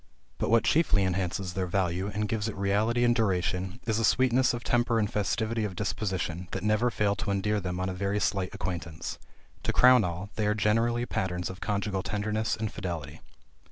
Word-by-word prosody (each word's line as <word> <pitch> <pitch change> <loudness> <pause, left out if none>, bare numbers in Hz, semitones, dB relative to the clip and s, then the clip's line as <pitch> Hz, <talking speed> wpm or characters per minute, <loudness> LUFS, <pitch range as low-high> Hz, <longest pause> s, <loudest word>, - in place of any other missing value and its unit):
But - - 0
what 115 -1 +4
chiefly 130 -11 +3
enhances 90 0 -1
their 95 0 -1
value, 90 +1 0
and 105 +1 -2
gives 110 0 -1
it 105 - -7
reality 105 +5 +1
and 120 0 +4
duration, 95 -1 0
is 110 -1 +1
a - - 0
sweetness 130 +3 +3
of 120 0 -4
temper 120 -1 +2
and 105 -2 +2
festivity 110 +3 -1
of 100 -3 -3
disposition, 95 -4 -2
that 95 - -3
never 110 +3 +2
fail 105 -3 +1
to 110 -1 -3
endear 105 +2 +1
them 90 -1 -4
on 95 - -1
a 95 - -2
very 100 +2 -1
slight 100 -2 0
acquaintance. 85 -3 -5 0.4
To - - 0
crown 125 -2 +6
all, 90 +4 -4
they 105 -1 +1
are 105 - +2
generally 115 +3 +1
patterns 90 -5 -2
of 95 - -11
conjugal 100 -2 -1
tenderness 105 +2 -1
and 110 -1 -3
fidelity. 85 -7 -5
100 Hz, 190 wpm, -28 LUFS, 95-110 Hz, 0.4 s, crown